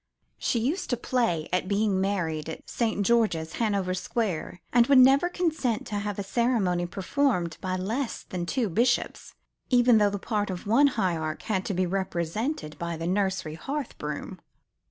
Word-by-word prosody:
She - - 0
used 280 - -1
to 245 - +1
play 230 -11 0
at 180 0 +1
being 200 -1 +1
married 165 -6 -1
at 160 - -8
St. 220 -4 -1
George's, 205 -9 +2
Hanover 200 -4 +1
Square, 185 -3 -2
and 240 -1 +5
would 280 - +6
never 270 +6 +6
consent 315 -11 -1
to 205 -1 -3
have 205 0 -3
the 200 - -3
ceremony 195 -5 +1
performed 185 - 0
by 185 -1 -2
less 225 +8 -3
than 175 -2 -5
two 230 +7 0
bishops; 235 +6 0 0.3
even 245 -3 +5
though 205 -1 +4
the 200 - -3
part 205 +1 -2
of 180 -2 -5
one 240 +8 +5
hierarch 170 - -1
had 190 -4 -1
to 195 - -2
be 185 +1 +1
represented 180 - -2
by 170 -1 -3
the 165 - -4
nursery 190 -3 0
hearth 275 - -4
broom. - - -5
205 Hz, 170 wpm, -27 LUFS, 180-240 Hz, 0.3 s, would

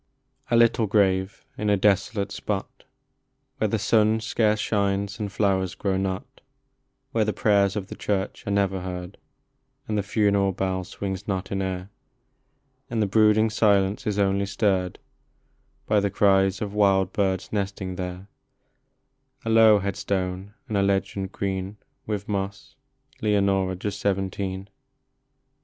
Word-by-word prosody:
LITTLE 115 -1 +4
grave 95 -1 +1
in 105 - 0
a 100 - +4
desolate 100 +1 +1
spot, 105 +5 -4 0.7
Where 110 - +2
the 110 - 0
sun 110 +1 +3
scarce 110 -1 +1
shines 100 -1 -1
and 105 -2 -3
flowers 95 -3 0
grow 95 -2 -1
not, 95 +7 -4 0.7
Where 115 -3 +2
the 105 0 -1
prayers 100 -1 +2
of 100 -2 -3
the - - -9
church 100 0 -3
are - - -1
never 100 -2 +1
heard, 90 +1 -6 0.7
And 105 -1 0
the - - +2
funeral 100 -1 +1
bell 95 0 -2
swings 95 +1 -5
not 95 -3 -3
in 95 0 -1
air, 95 +1 -4 1.0
And 115 - -2
the 105 - +3
brooding 110 +2 +4
silence 105 +1 +2
is 105 -1 0
only 100 0 +1
stirred 95 -3 0 0.9
By 105 -1 +3
the 100 0 0
cries 95 0 +3
of 100 -1 -5
wild 95 -3 +3
birds 95 -2 -1
nesting 100 -2 -3
there; 90 +1 -6 1.2
A 115 - 0
low 110 -1 +7
headstone, 100 0 -3
and 105 - -1
a - - +3
legend, 100 0 0
green 95 0 -3 0.3
With 105 -1 -3
moss: 100 -1 -4 0.2
" - - -33
Leonora, 100 -3 +2
just 100 +2 -4
seventeen." 95 -1 -2
100 Hz, 140 wpm, -25 LUFS, 95-105 Hz, 1.2 s, low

